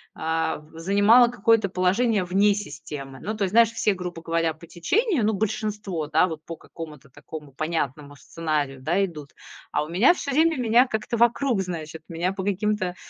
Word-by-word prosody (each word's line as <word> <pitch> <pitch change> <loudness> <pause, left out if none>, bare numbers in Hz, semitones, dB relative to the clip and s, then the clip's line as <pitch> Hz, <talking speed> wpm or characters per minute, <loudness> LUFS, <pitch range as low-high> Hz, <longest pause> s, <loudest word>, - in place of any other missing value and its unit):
а 160 0 -1
в 155 +2 -14
занимала 205 +7 +5
какое-то 225 -2 +2
положение 195 +4 +1
вне 195 +3 +3
системы. 145 -7 -7
Ну, 215 +2 -3
то 210 - -1
есть, 190 - -1
знаешь, 230 +1 +5
все, 215 -2 +1
грубо 180 -2 -6
говоря, 165 -1 0
по 165 +2 -14
течению, 330 - 0
ну, 220 - +2
большинство, 205 -5 -2
да, 155 +4 +3
вот 160 -3 -7
по 165 - -6
какому-то 150 -4 -11
такому 150 +1 -10
понятному 145 -2 -3
сценарию, 145 -4 -3
да, 175 +8 +1
идут. 150 -6 -10 0.4
А - - 0
у - - -7
меня 195 - +5
всё 280 - -4
время 320 +3 +3
меня 245 +1 +4
как-то 220 0 -3
вокруг, 235 -1 +2
значит, 160 -3 -6
меня 175 +3 -1
по 190 -1 -5
каким-то 200 -2 -1
180 Hz, 180 wpm, -24 LUFS, 160-215 Hz, 0.4 s, занимала